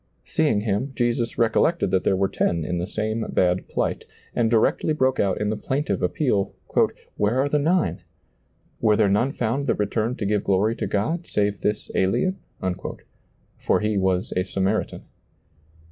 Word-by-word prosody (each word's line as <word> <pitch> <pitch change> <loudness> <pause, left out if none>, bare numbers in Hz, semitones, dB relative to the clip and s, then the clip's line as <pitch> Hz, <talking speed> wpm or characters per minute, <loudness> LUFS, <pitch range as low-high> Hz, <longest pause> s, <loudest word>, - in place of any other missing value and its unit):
Seeing 150 -10 +1
him, 110 +6 -1
Jesus 120 -1 0
recol 115 -2 +2
lected 170 +1 +1
that 95 - +2
there 95 - +2
were 95 +1 +2
ten 85 -4 0
in 90 +1 -2
the 90 - -2
same 110 +1 -2
bad 90 0 +1
plight, - - -2 0.3
and 115 -2 +2
directly 115 +6 +2
broke 130 -3 +1
out 95 -2 +1
in 105 0 0
the - - -1
plaintive 140 +7 -2
appeal, 105 -10 0 0.3
" - - -22
Where 105 +5 +1
arc 140 +1 +1
the 150 - +3
nine? 170 +5 +1 0.8
Were 110 -1 +4
there 105 -1 +3
none 110 +7 +2
found 130 +2 -1
that - - +2
returned 110 +4 -1
to 105 - -3
give 105 0 +1
glory 100 +4 +2
to - - -2
God, 160 - -1
save 100 -1 0
this 105 0 -2
alien? 185 - +1 0.6
" - - -35
For - - +2
he 105 0 0
was 95 +1 0
a 90 - +2
Samaritan. 95 +3 -1
110 Hz, 175 wpm, -24 LUFS, 100-130 Hz, 0.8 s, Were